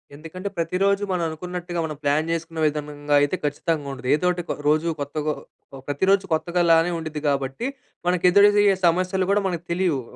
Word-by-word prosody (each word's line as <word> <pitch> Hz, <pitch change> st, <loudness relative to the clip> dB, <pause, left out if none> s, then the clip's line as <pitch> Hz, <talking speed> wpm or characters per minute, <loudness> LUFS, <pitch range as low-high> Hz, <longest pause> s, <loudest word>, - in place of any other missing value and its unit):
ఎందుకంటే, 165 Hz, +6 st, -7 dB
ప్రతిరోజు 195 Hz, +4 st, +1 dB
మనం 180 Hz, -2 st, 0 dB
అనుకున్నట్టుగా 175 Hz, +2 st, -5 dB
మనం 155 Hz, -1 st, -5 dB
ప్లాన్ 150 Hz, +3 st, +1 dB
చేసుకునే 165 Hz, 0 st, -4 dB
విధానంగా 145 Hz, -1 st, -2 dB
అయితే 145 Hz, +6 st, +1 dB
ఖచ్చితంగా 145 Hz, 0 st, -1 dB
ఉండదు. 125 Hz, -1 st, -8 dB
ఏదోకటి 180 Hz, +2 st, 0 dB
కొ -, -, -1 dB
రోజు 155 Hz, +2 st, +2 dB
కొత్తగా 150 Hz, +1 st, -2 dB, 0.5 s
ప్రతిరోజు 190 Hz, +7 st, +2 dB
కొత్తగా 175 Hz, +2 st, 0 dB
లానే 165 Hz, +2 st, +4 dB
ఉండుద్ది 155 Hz, -2 st, -5 dB
గాబట్టి, 140 Hz, -, -1 dB, 0.4 s
మనకు 180 Hz, 0 st, +1 dB
ఎదురయ్యే 205 Hz, 0 st, +5 dB
సమస్యలు 185 Hz, +2 st, +1 dB
కూడా 205 Hz, 0 st, +3 dB
మనకు 175 Hz, -2 st, -4 dB
తెలియవు. 170 Hz, -7 st, +1 dB
165 Hz, 155 wpm, -23 LUFS, 150-185 Hz, 0.5 s, ఎదురయ్యే